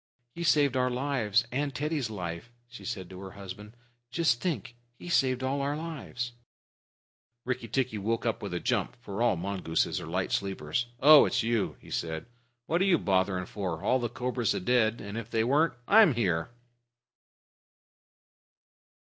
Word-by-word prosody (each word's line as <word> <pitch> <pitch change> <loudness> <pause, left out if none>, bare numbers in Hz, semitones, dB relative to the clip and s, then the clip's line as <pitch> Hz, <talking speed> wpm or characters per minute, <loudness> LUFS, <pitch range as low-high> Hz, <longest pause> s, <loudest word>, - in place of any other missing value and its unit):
"He 170 - -5
saved 145 -5 +3
our 125 0 +2
lives 125 -3 +1
and 140 +1 -2
Teddy's 150 -4 -1
life," 90 +1 -6 0.2
she 120 0 -12
said 95 -6 -4
to 95 - -9
her 95 0 -8
husband. 100 +3 -10 0.3
"Just 125 -4 +1
think, 160 -8 -3 0.2
he 175 - -9
saved 130 -6 +2
all 135 +2 0
our 145 +2 -1
lives." 150 -7 -5 1.1
Rikki 125 -2 -2
tikki 120 -2 -1
woke 115 +4 -1
up 115 - -1
with 100 - -5
a - - -1
jump, - - -1
for 100 -3 -7
the 120 -3 +3
mongooses 90 -2 -1
are - - -7
light 90 +3 -2
sleepers. 100 +3 -1
"Oh, 150 +1 +9
it's 120 -2 0
you," 115 -2 0
said 80 -1 -2
he. - - -26 0.4
"What 170 +7 +1
are - - +4
you 185 -3 +5
bothering 95 -4 +1
for? 90 -5 -4
All 130 - +3
the 120 -1 -2
cobras 125 -1 -1
are - - -1
dead. 110 +2 +2
And 100 +2 -5
if 115 -1 -8
they 110 -1 +1
weren't, 145 +5 +2
I'm 205 - +7
here." 90 -7 0
120 Hz, 165 wpm, -29 LUFS, 100-135 Hz, 1.1 s, Oh